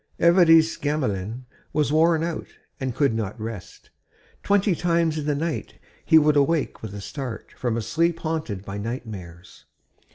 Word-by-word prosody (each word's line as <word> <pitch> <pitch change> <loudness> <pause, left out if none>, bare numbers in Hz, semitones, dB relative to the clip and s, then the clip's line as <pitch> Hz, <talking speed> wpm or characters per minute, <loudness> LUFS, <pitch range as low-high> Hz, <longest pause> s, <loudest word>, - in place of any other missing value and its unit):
XXIII 170 - +6
Évariste 165 -3 +5
Gamelin 125 -6 -2 0.3
was 150 -1 +1
worn 160 0 +4
out 170 -1 -3 0.3
and 130 -3 -3
could 140 -5 +2
not 110 -2 -3
rest; 110 -4 -8 0.5
twenty 200 -1 +2
times 170 -2 +1
in 150 - -4
the 145 - +1
night 160 +3 -3 0.3
he 160 - +6
would 150 -1 +4
awake 145 +1 +1
with 105 -2 -7
a 100 - -6
start 125 -1 -6
from 120 -2 -1
a 115 - -2
sleep 165 +7 +1
haunted 155 - -3
by 100 +1 -5
nightmares. 100 -7 -7
145 Hz, 160 wpm, -24 LUFS, 110-165 Hz, 0.5 s, XXIII